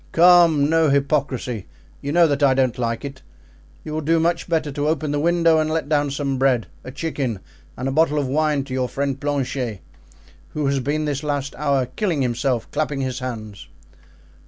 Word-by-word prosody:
"Come, 170 -4 +6
no 160 0 +3
hypocrisy! 135 -6 0 0.3
you 140 - -3
know 170 +2 +5
that 145 -2 0
I 135 -2 +4
don't 130 -2 +1
like 115 +1 -2
it. 135 -1 -8 0.6
You 155 - -6
will 155 - -2
do 165 +2 +2
much 170 +1 0
better 155 -3 0
to 145 +2 -2
open 155 -1 0
the 145 - 0
window 165 0 +3
and 155 0 0
let 160 -2 -1
down 145 -2 +2
some 140 -1 -2
bread, 130 -4 +2 0.2
a - - -8
chicken 135 - -3 0.4
and 130 - -3
a - - 0
bottle 150 +1 +2
of 145 - +1
wine 150 0 +1
to 135 -1 -8
your 130 -1 -1
friend 140 -1 -2
Planchet, 135 -6 -2 0.7
who 150 -1 -2
has 140 0 +1
been 150 +4 -1
this 145 -2 -2
last 145 -2 -2
hour 140 -3 +1
killing 165 - -1
himself 120 -1 -1
clapping 150 -3 -1
his 130 -1 -3
hands." 110 -5 -7
140 Hz, 190 wpm, -22 LUFS, 130-155 Hz, 0.7 s, Come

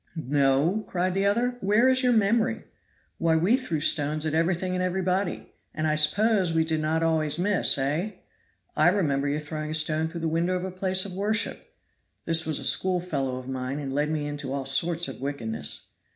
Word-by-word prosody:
"No?" 145 - +1
cried 180 0 -1
the 195 +1 +1
other, 245 +4 0
"where 210 +6 +3
is 260 0 +4
your 250 -2 +3
memory? 225 +1 +1 0.6
Why, 165 -1 +2
we 180 +9 +3
threw 250 - -2
stones 150 +1 +1
at 155 - -1
everything 175 +3 0
and 180 - -1
everybody, 185 +1 -2 0.2
and 155 +1 -2
I 155 - +2
suppose 185 +5 +3
we 160 0 +1
did 160 -1 -1
not 160 +1 0
always 160 -2 +1
miss, 195 -2 +2
eh? 150 +10 -1 0.6
I 155 - +4
remember 145 -7 +1
your 145 +1 -1
throwing 155 0 -5
a 155 - -1
stone 155 0 +1
through 170 +1 -7
the 165 - -1
window 170 +3 0
of 180 - -3
a 190 - -4
place 185 +1 0
of 195 - -7
worship 210 +4 -1 0.5
(this 165 -1 +3
was 155 - 0
a - - -5
school 185 -1 +2
fellow 140 -7 -3
of 130 0 -8
mine, 130 +1 -4
and 140 -2 -5
led 145 +2 0
me 155 -1 -2
into 145 -2 -5
all 135 -1 -3
sorts 165 +5 0
of - - -8
wickedness). 115 - -5
165 Hz, 200 wpm, -26 LUFS, 150-190 Hz, 0.6 s, is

